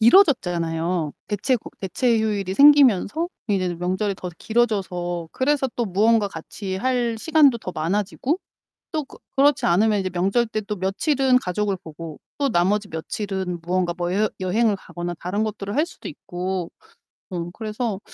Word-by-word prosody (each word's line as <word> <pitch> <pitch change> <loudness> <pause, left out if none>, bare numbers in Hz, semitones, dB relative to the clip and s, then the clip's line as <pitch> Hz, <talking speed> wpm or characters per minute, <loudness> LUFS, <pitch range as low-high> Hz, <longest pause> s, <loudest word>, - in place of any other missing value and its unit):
길어졌잖아요. 175 - +3 0.2
대체 230 +5 +1 0.2
대체 230 +5 +1
휴일이 205 -4 -1
생기면서 285 - +5 0.2
이제 185 -3 0
명절이 185 +4 -1
더 180 - -6
길어져서 185 -7 -1
그래서 270 0 +1
또 240 - +1
무언가 210 +2 +3
같이 190 +3 -6
할 245 +1 0
시간도 290 -3 +4
더 185 - -6
많아지고 205 - -1 0.5
또 310 -3 -1
그 - - -15 0.2
그렇지 280 +1 +4
않으면 210 +4 +3
이제 190 -1 -1
명절 195 +7 +1
때 215 0 -2
또 210 0 -4
며칠은 255 - +2
가족을 200 0 -1
보고 160 -1 -9 0.2
또 280 -1 +1
나머지 200 +1 +2
며칠은 185 +2 -4
무언가 175 +1 0
뭐 175 0 -1
여 210 +2 +2
여행을 205 +4 +2
가거나 175 -2 -6
다른 200 +5 -1
것들을 205 -1 -4
할 300 +3 +3
수도 350 - -11
있고 185 - -4 0.6
어 175 -2 -4
그래서 215 -1 -3
200 Hz, 330 characters per minute, -23 LUFS, 180-240 Hz, 0.6 s, 생기면서